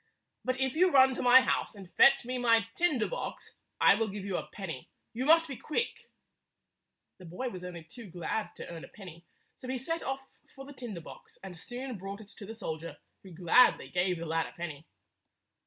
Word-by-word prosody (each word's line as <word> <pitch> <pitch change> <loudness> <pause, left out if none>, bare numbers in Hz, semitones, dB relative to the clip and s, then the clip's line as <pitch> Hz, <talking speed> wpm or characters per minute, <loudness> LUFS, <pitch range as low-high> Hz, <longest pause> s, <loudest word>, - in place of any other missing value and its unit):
But 255 0 -1
if 265 -1 +1
you 365 +3 +5
run 265 -4 +6
to - - -4
my 250 +1 +8
house - - -1
and 190 -3 -12
fetch 275 -3 +6
me 250 +1 -2
my 230 -3 +4
tinder 305 -9 +1
box, - - -6 0.3
I - - +7
will 220 +2 0
give 200 -1 -6
you 195 -2 -2
a - - -3
penny. 165 -10 -7 0.2
You 250 +3 -2
must 330 +1 +6
be 275 - -5
quick." 310 - -3 1.1
The 185 - -12
boy 180 +10 -4
was 185 -5 -8
only 175 -2 -7
too 200 +6 -11
glad 180 +5 -3
to - - -8
earn 165 -2 -8
a - - -9
penny, 175 -4 -12 0.3
so 255 - -10
he 260 0 -2
set 330 +7 -3
off 270 0 -3 0.3
for 270 - -9
the 285 - -11
tinder 235 -9 -7
box, - - -13
and 190 -2 -8
soon 245 +5 -6
brought 195 +2 -6
it 215 -2 -13
to 205 -2 -11
the 225 - -7
soldier, 165 -6 -6 0.2
who 190 - -13
gladly 180 +8 +4
gave 180 0 0
the 165 - -5
lad 165 0 0
a - - -13
penny. 160 -3 -7
215 Hz, 210 wpm, -30 LUFS, 175-260 Hz, 1.1 s, my